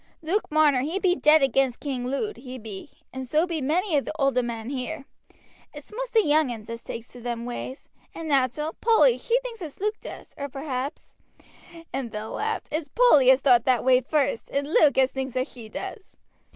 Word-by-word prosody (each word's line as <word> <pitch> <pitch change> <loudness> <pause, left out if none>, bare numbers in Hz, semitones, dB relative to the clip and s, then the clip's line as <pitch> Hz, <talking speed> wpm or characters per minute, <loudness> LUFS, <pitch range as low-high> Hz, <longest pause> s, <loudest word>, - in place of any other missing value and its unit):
"Luke 370 +7 -1
Marner 300 -4 +4
he 315 +8 -2
be 375 -2 +2
dead 305 -2 +5
against 265 -1 +1
King 260 -4 -3
Lud, 275 - -2
he 255 0 -8
be, 215 +1 -9 0.2
and 260 -1 -5
so 310 +6 +2
be 335 -4 -3
many 330 +6 0
of 280 - +2
the - - -5
older 275 -4 +2
men 235 0 -5
here; 275 +2 -4 0.7
it's 295 +8 -9
most - - -5
the 445 - +6
young 300 -1 +3
uns 225 -1 -8
as 230 0 -7
takes 230 +1 -7
to 245 - -13
them 235 -1 -4
ways; 245 +2 -6 0.3
and 330 - -6
nateral, 290 +2 +1
Polly 465 +1 +5
she 485 +1 0
thinks 475 -4 -8
as 310 -5 -8
Luke 425 +2 -1
does, - - -10
or 280 0 -4
perhaps," 270 0 -5 0.8
and 265 -2 -3
Bill 215 0 -6
laughed, 440 +1 -3
"it's 310 0 -2
Polly 300 - +5
as 260 +1 +6
thowt 245 -4 +5
that 255 -2 +2
way 255 0 +5
first, 275 -3 -1
and 280 0 -1
Luke 285 -4 +5
as 265 0 +4
thinks 265 -1 -4
as 255 +1 0
she 230 -3 -11
does. 385 - -8
275 Hz, 205 wpm, -25 LUFS, 250-320 Hz, 0.8 s, the